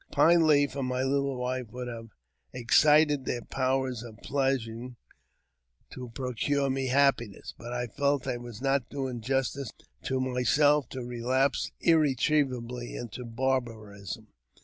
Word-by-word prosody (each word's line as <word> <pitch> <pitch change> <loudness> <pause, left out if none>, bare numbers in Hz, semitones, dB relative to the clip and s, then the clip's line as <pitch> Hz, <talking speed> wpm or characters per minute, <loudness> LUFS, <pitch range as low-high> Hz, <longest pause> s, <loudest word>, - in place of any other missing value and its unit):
Pine 170 -1 +5
Leaf 145 -2 +3
and 135 -2 -2
my 125 0 -1
little 140 0 0
wife 125 0 -2
would 125 0 -6
have 115 -1 -7 0.4
excited 150 +4 +4
their 120 -1 -2
powers 130 -2 -1
of 115 -2 -10
pleasing 125 -3 -1 1.0
to 125 -1 -8
procure 135 +2 0
me 135 0 -1
happiness; 125 -6 +1
but 120 +1 -9
I 125 0 -2
felt 140 +3 0
I 130 -2 -2
was 120 0 -9
not 135 -3 +1
doing 130 -4 -4
justice 135 0 -1 0.3
to 130 -1 0
myself 130 +2 +2
to 130 -2 -6
relapse 125 +3 0
irre 155 -5 +4
trievably 125 -4 -1
into 120 +1 -7
barbarism. 115 -5 -3
130 Hz, 135 wpm, -28 LUFS, 120-140 Hz, 1.0 s, Pine